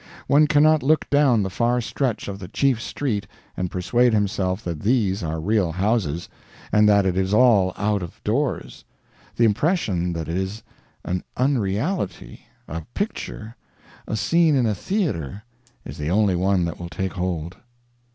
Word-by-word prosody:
One 150 +2 +4
cannot 155 0 +4
look 150 +3 +2
down 140 -7 +4
the 95 - -3
far 120 +4 +1
stretch 120 0 -2
of 100 -1 -5
the 90 - -7
chief 130 +3 +1
street 105 -10 -3 0.3
and 90 -1 -2
persuade 120 +7 +2
himself 100 -1 -1
that 85 -4 -4
these 105 - +1
are 80 -1 -3
real 95 0 +1
houses, 95 -4 0 0.4
and 105 0 +5
that 100 -1 +4
it 90 -2 +1
is 95 +2 +1
all 110 -6 +5
out 105 -1 0
of 90 +5 -8
doors 130 +6 -2 0.5
the 115 - +3
impression 105 - +1
that 80 -3 -4
it 85 +2 -2
is 95 +3 -4 0.4
an 90 0 -2
unreality, 125 - -1 0.2
a 85 +2 -5
picture, 115 - -4 0.5
a - - -2
scene 165 +6 +3
in 130 -3 +2
a 110 - +1
theater, 105 - -2 0.4
is - - -8
the 75 +1 -2
only 100 0 +2
one 90 0 +1
that 85 - -5
will 85 -1 -6
take 95 +1 -3
hold. 90 -1 -3
105 Hz, 160 wpm, -23 LUFS, 90-125 Hz, 0.5 s, and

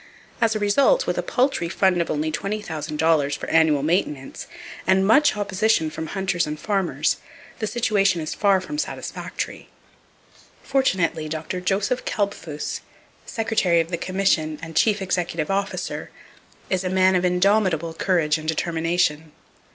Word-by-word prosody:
As 225 -1 +3
a - - 0
result, 275 - +3
with - - -1
a - - +1
paltry 250 -10 0
fund 185 -1 +2
of 170 - -3
only 155 +1 -1
$20,000 160 -6 -1
for - - -6
annual 160 -3 +4
maintenance, 150 -4 -2 0.4
and 190 0 +4
much 225 +4 +4
opposition 200 -4 +1
from 160 +1 -5
hunters 190 -2 -1
and 150 0 -5
farmers, 195 -1 0 0.4
the 215 - -1
situation 200 -6 +1
is 155 -1 -3
far 200 -2 +3
from 300 +10 -5
satisfactory. - - -5 0.9
Fortunately 190 - 0
Dr. 160 +3 -4
Joseph 195 +6 0
Kalbfus, 200 -7 -3 0.5
Secretary 215 -6 +1
of 165 +1 -1
the - - +1
Commission 175 -4 0
and 165 -1 -8
chief 210 +3 +3
executive 175 -3 -1
officer, 195 0 -3 0.6
is 185 -1 -1
a 185 - -1
man 185 0 +3
of 180 - +2
indomitable 180 -3 +2
courage 165 -3 +1
and 155 - -8
determination. 160 -1 0
180 Hz, 140 wpm, -23 LUFS, 160-200 Hz, 0.9 s, annual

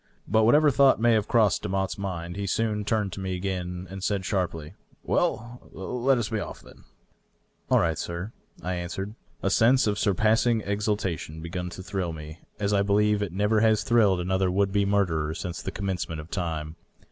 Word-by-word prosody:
But 110 +1 +3
whatever 150 +5 +5
thought 135 -2 +5
may 120 0 +4
have 110 -1 +1
croi^sed 110 -6 +3
Demotte's 95 0 -1
mind, 85 -3 -5
he 100 0 -3
soon 105 +1 0
turned 105 -3 0
to - - -6
me 95 -1 -3
again 90 -1 -4
and 95 +1 -8
said 100 -2 -1
sharply, 85 -5 -2 0.2
" - - -33
Well, 120 +2 -1
let 125 +7 0
us 115 -3 -2
be 110 -2 -1
off - - -7
at - - -13
once." - - -21 0.8
"All - - +5
right, 80 -2 0
sir," 85 +5 -4 0.3
I 90 - -2
answered. 90 +3 -4 0.3
A 95 - +1
sense 125 +6 +4
of 105 -1 0
surpassing 110 +3 +2
exultation 100 -6 -2
had 80 - -9
begun 90 +1 -4
to 95 +2 -9
thrill 90 -3 -3
me, 80 +1 -9 0.2
as 100 0 0
I 100 - +3
believe 105 +1 +2
it 100 -4 -2
never 105 +4 +2
has 110 -1 +3
thrilled 105 -6 +3
another 95 +1 +1
would 100 +1 +1
be 100 0 +2
murderer 85 -6 +1
since 85 0 -5
the - - -4
commencement 95 -5 -3
of 75 +2 -10
time. 80 -3 -3
100 Hz, 195 wpm, -26 LUFS, 90-105 Hz, 0.8 s, whatever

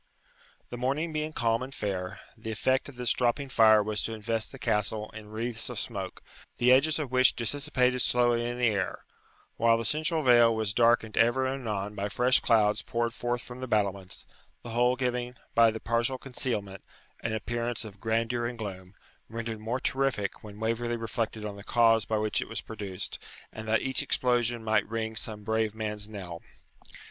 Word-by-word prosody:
The 120 - -6
morning 145 +6 -1
being 155 0 -2
calm 115 -5 +1
and 130 +1 -5
fair, 95 -1 -3 0.2
the 110 0 -8
effect 130 +5 +1
of 140 - -12
this 125 -2 +1
dropping 125 +3 0
fire 110 -4 +6
was 105 0 -1
to 115 - -2
invest 110 +1 -2
the - - -9
Castle 105 0 0
in 110 -1 -10
wreaths 115 +2 -2
of 125 - -6
smoke, 100 -5 -4 0.3
the 125 +1 +4
edges 150 +4 +5
of 145 -5 -3
which 130 -1 +5
dissipated 125 0 +1
slowly 120 -1 +3
in 120 - -4
the 125 - +2
air, 100 -3 -2 0.5
while 115 0 +4
the 115 - -3
central 155 - +1
veil 120 -3 +6
was 110 -2 -1
darkened 115 -1 +3
ever 120 +3 +4
and 130 -2 -3
anon 105 -1 -2
by 100 0 -3
fresh 125 +4 +4
clouds 105 -2 +3
poured 115 0 -1
forth 120 +1 -2
from 125 0 -10
the 130 - -5
battlements; 100 -4 -1 0.4
the 120 - -7
whole 125 +2 +3
giving, 125 -1 -2 0.2
by 115 0 +6
the 110 0 -4
partial 120 +3 0
concealment, 105 -7 -3 0.4
an 115 - -3
appearance 120 +2 -2
of 100 -2 -11
grandeur 115 +1 0
and 120 0 -6
gloom, 95 -3 -7 0.3
rendered 115 0 -4
more 115 +4 -2
terrific 130 -7 -1
when 105 -1 -10
Waverley 115 +1 -1
reflected 115 -1 -3
on 100 -1 -5
the 100 - -10
cause 115 -1 +4
by 110 - 0
which 105 0 0
it - - -6
was 115 - -3
produced, 100 -4 -5 0.3
and 110 0 -7
that 110 +1 +2
each 130 -1 +1
explosion 120 -2 +1
might 110 -2 +1
ring 110 0 -3
some 105 -1 -2
brave 110 0 0
man's 105 -1 -3
knell. 90 -5 -7
115 Hz, 185 wpm, -29 LUFS, 110-125 Hz, 0.5 s, fire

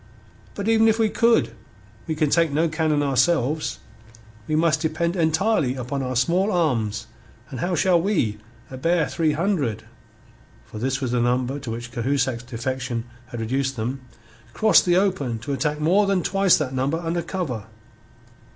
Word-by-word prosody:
But 200 +1 -4
even 225 0 +4
if 220 0 +3
we 220 -1 +2
could, 230 - +2 0.5
we 160 - -1
can 155 -2 0
take 165 -3 +3
no 160 +4 +2
cannon 155 -2 0
ourselves; 145 +2 +1 0.7
we 155 - 0
must 160 -1 +2
depend 170 +2 -1
entirely 160 - +1
upon 130 +2 -4
our 130 -1 -3
small 175 - +2
arms, 125 - 0 0.5
and 130 - -6
how 175 +6 -1
shall 175 +1 +3
we, 145 - 0 0.3
a 130 - -6
bare 165 +3 +1
three 160 -2 0
hundred" 155 - -1 0.8
(for 110 - -9
this 130 +3 -1
was 130 -3 -2
the 125 -1 +1
number 125 +3 0
to 130 -4 -7
which 120 +1 -6
Cahusac's 125 0 -1
defection 125 0 -4 0.2
had 120 -2 -7
reduced 130 +4 -1
them), 125 +4 -3 0.5
"cross 220 0 +5
the 175 -1 +2
open 180 - 0
to 140 +6 -5
attack 150 +3 -1
more 185 +7 +3
than 195 -3 +1
twice 195 0 +3
that 135 -4 -3
number 135 +5 0
under 170 0 -2
cover?" 160 - -4
150 Hz, 165 wpm, -23 LUFS, 125-170 Hz, 0.8 s, cross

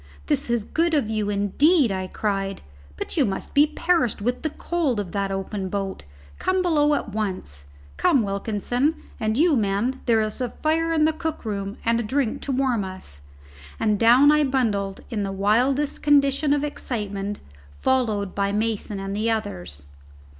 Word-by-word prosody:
"This 70 - 0
is 235 -2 +1
good 330 +7 +1
of 225 -7 +1
you, 215 -2 -1
indeed!" 235 - +3
I 190 -1 -2
cried. 195 -1 -2 0.3
"But - - -5
you 295 - +5
must 195 -5 -3
be 290 +2 +5
perished 330 - +1
with 245 +4 -1
the 310 - -1
cold 300 -7 -1
of 190 -4 -4
that 200 -1 -1
open 195 0 -3
boat. 195 - -4 0.3
Come 370 0 +1
below 300 -4 +3
at 245 - -3
once 185 - -4 0.3
come 255 - +3
Wilkinson, 220 +8 -1 0.2
and 215 +1 0
you 325 0 +4
men 220 +4 0
there's 220 0 +1
a 250 - -1
fire 325 +4 0
in 315 -2 +3
the 315 - +2
cook 315 -4 -4
room 200 -1 -3
and 230 -1 +1
drink 265 -4 0
to 280 - -3
warm 255 -5 +1
us;" 185 - -7 0.6
and 210 -2 +1
down 245 +6 +7
I 300 0 +4
bundled 215 -8 0
in 220 -3 -1
the 195 -1 -2
wildest 245 +9 +1
condition 285 0 +3
of 290 0 +2
excitement, 205 -8 -4 0.4
followed 220 -7 0
by 200 0 0
Mason 210 -1 -2
and 195 0 -4
the 220 +2 0
others. 90 - -3
225 Hz, 170 wpm, -24 LUFS, 200-280 Hz, 0.6 s, down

